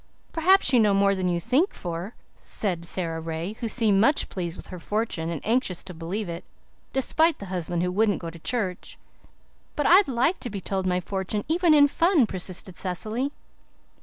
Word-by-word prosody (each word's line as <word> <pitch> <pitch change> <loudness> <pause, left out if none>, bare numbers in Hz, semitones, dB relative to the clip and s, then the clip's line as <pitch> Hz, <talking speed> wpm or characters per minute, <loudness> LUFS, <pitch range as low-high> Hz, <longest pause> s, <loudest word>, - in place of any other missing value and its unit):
"Perhaps 335 -3 +4
you 245 - +6
know 210 -3 +4
more 200 0 +3
than 185 -2 -1
you 175 -1 0
think 260 - +1
for," 175 +5 -5 0.2
said 175 -5 -3
Sara 165 -3 -2
Ray, 165 +4 -4
who 235 - -2
seemed 215 -4 +2
much 285 +6 +3
pleased 175 -2 -4
with - - -11
her 180 - -6
fortune 205 -4 -2
and 165 -4 -5
anxious 225 -6 +1
to 185 - -8
believe 175 +5 -4
it, 170 0 -6 0.5
despite 315 +5 +2
the 200 - -8
husband 175 -1 -2
who 180 - 0
wouldn't 205 +1 +2
go 165 -1 -6
to 170 - -12
church. 190 -2 -2 0.8
"But 295 - -1
I'd 380 +3 +6
like 265 +8 +1
to 245 - -3
be 200 -2 -5
told 190 0 -2
my 180 0 +1
fortune, 195 +3 -3
even 330 0 +3
in 285 -1 +7
fun," 330 -2 +3
persisted 185 -1 -3
Cecily. 215 +9 -2
200 Hz, 190 wpm, -25 LUFS, 180-255 Hz, 0.8 s, in